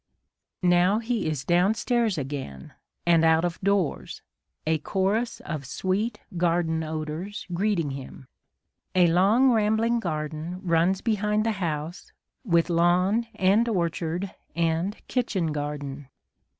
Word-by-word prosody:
Now 180 +3 +4
he 230 -4 -1
is 145 -4 -3
downstairs 215 - +2
again 135 - -6 0.3
and 170 -1 +4
out 160 +1 +4
of 175 -1 -4
doors, 200 -5 -1 0.4
a 160 0 +1
chorus 205 +8 -1
of 155 -3 -5
sweet 205 - -1 0.2
garden 165 -2 +1
odours 155 +5 -5
greeting 175 -5 0
him. 135 -1 -9 0.7
A 180 -1 +6
long 200 +10 +4
rambling 225 +1 +2
garden 155 -1 -4
runs 175 +2 +2
behind 210 -1 0
the 225 - +2
house, 160 0 -4 0.3
with 170 -7 +2
lawn 180 +6 +2
and 205 +5 +3
orchard 175 -1 -2 0.2
and 165 +4 0
kitchen 195 -10 -1
garden. 145 -2 -5
175 Hz, 115 wpm, -26 LUFS, 160-210 Hz, 0.7 s, A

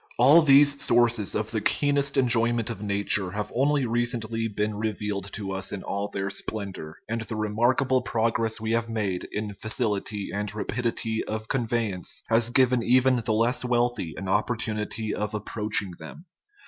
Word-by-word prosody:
All 140 +7 +7
these 140 -1 +5
sources 120 -3 +2
of 105 0 -2
the 110 -2 -1
keenest 140 +4 +1
enjoyment 120 -2 +2
of 110 - -7
nature 100 -2 +1
have 105 +2 -4
only 140 +1 +2
recently 115 -1 -1
been 105 0 -2
revealed 105 -2 -3
to 100 -2 -4
us 95 0 -4
in 100 - -5
all 100 +1 -3
their 100 -1 -3
splendor, 100 -8 -5
and 115 +1 -2
the 115 0 -5
remarkable 120 +5 +1
progress 115 -1 0
we 110 0 -3
have 115 0 0
made 105 -5 -2
in 105 0 -4
facility 105 -2 -3
and 105 +1 -3
rapidity 110 0 -2
of 110 0 -4
conveyance 115 -7 -1
has 115 0 +3
given 125 -1 +3
even 130 +2 +4
the 115 -1 -1
less 115 +4 +2
wealthy 120 -8 0
an 95 - -5
opportunity 110 +1 -1
of 105 0 -3
approaching 105 -2 -2
them. 80 - -11
110 Hz, 160 wpm, -26 LUFS, 105-120 Hz, -, All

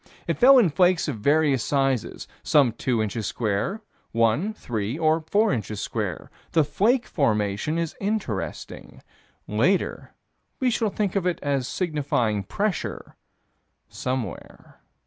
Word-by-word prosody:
It - - -2
fell 270 +2 +8
in 205 -10 +4
flakes 180 +1 +3
of 130 -8 -3
various 140 0 +2
sizes; 135 -4 -1
some 140 -5 +4
two 115 0 -1
inches 105 -1 -3
square, 120 - -2 0.3
one, 115 - +2
three 115 - -4
or 160 0 +2
four 215 -2 +3
inches 105 -3 -4
square. 105 -8 -4 0.2
The 160 - +5
flake 220 - +1
formation 110 - 0
is 170 -2 -2
interesting: 210 +2 -4 0.4
later - - 0 0.4
we 255 -3 +2
shall 225 -2 0
think 205 -1 -2
of 190 -2 +1
it 180 - 0
as 140 -3 0
signifying 140 - -1
pressure 200 - -3 0.7
somewhere. 125 -7 -5
145 Hz, 125 wpm, -24 LUFS, 115-185 Hz, 0.7 s, fell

